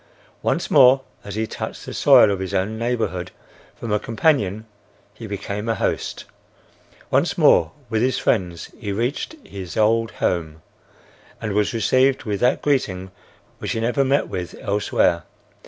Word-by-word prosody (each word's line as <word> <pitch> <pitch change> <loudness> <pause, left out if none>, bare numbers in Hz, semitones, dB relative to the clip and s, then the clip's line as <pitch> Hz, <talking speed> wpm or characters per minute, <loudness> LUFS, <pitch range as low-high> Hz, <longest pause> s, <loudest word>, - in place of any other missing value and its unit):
Once - - -1
more, 135 -1 +7 0.2
as 100 -1 -7
he 110 +1 0
touched - - -6
the - - -7
soil 105 - +6
of 100 - -2
his 95 +1 -4
own 95 +4 0
neighborhood, 110 -7 -2 0.5
from 115 - -6
a 105 - +2
companion 110 - 0 0.5
he 110 +1 -9
became 100 +2 -4
a 115 - +1
host. - - -2 0.9
Once - - +2
more 80 -1 +5 0.2
with 110 -2 0
his 130 +1 +1
friends 90 -6 -1
he 105 -4 -4
reached 120 - -2
his 95 -3 -8
old 115 +1 +3
home 80 -3 -2 0.8
and 105 -2 -3
was 105 0 +1
received 130 +4 +2
with 105 -3 -2
that 125 +1 +2
greeting 95 -10 0 0.5
which - - -3
he - - -2
never 120 +5 +1
met 135 +2 +1
with 90 -2 -5
elsewhere. 100 -4 +1
110 Hz, 155 wpm, -22 LUFS, 95-120 Hz, 0.9 s, more